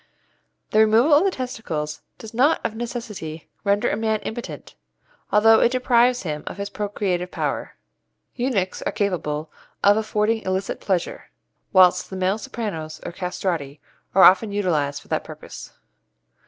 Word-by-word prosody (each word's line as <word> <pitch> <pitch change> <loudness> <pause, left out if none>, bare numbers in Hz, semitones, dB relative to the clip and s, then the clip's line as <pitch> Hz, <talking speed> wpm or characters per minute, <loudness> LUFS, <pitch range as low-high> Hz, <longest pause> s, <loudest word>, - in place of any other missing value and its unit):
The 215 - +3
removal 225 +7 +5
of 295 +4 +6
the 390 - +3
testicles 170 - -4 0.2
does 220 0 -10
not 270 +7 +3
of 220 - -2
necessity 215 - -6
render 200 0 +2
a - - +1
man 220 0 0
impotent, 235 +2 -7 0.6
although 220 +2 +6
it 240 - +3
deprives 245 -1 +3
him 150 -4 -4
of - - -6
his 200 0 -5
procreative 200 -4 -2
power. - - -3 0.6
Eunuchs 240 -7 -1
are - - -2
capable 160 -7 -2 0.3
of 205 +1 +6
affording 215 +1 0
illicit 190 0 -2
pleasure, 185 -4 -2 0.4
whilst 180 -1 +5
the 190 - -6
male 190 +3 0
sopranos, 165 -10 -5
or - - -4
castrati, 170 -5 -3 0.4
are 190 - +7
often 190 +3 +6
utilized 155 -8 -1
for - - -22
that - - -1
purpose. - - -10
200 Hz, 145 wpm, -23 LUFS, 180-225 Hz, 0.6 s, are